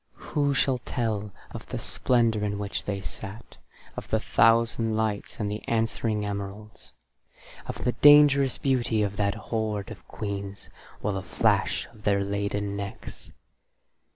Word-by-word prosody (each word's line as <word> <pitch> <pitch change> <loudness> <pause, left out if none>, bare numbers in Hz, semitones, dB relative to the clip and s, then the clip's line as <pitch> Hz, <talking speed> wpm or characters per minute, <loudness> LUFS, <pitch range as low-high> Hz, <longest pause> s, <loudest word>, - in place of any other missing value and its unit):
Who 145 -2 +1
shall 130 -1 +2
tell 110 -4 -2 0.2
of - - -8
the - - -4
splendour 115 -4 +1
in 100 -1 -1
which 100 0 -4
they 100 -1 -3
sat; 100 +3 -8 0.4
of - - -7
the - - +1
thousand 115 -1 +3
lights 110 -2 -2
and 105 - -1
the 105 - -4
answering 110 -2 0
emeralds; 100 +1 -7 0.7
of - - -5
the 125 - +2
dangerous 140 0 +6
beauty 120 -5 +1
of 100 0 -2
that 100 -1 +1
hoard 110 -1 -3
of 110 - -11
queens, 100 -2 -6 0.3
or 105 - 0
the 95 - -2
flash 90 - +1
of 110 - -17
their 100 -1 +2
laden 100 0 -2
necks? 100 -1 -8
105 Hz, 145 wpm, -27 LUFS, 100-115 Hz, 0.7 s, dangerous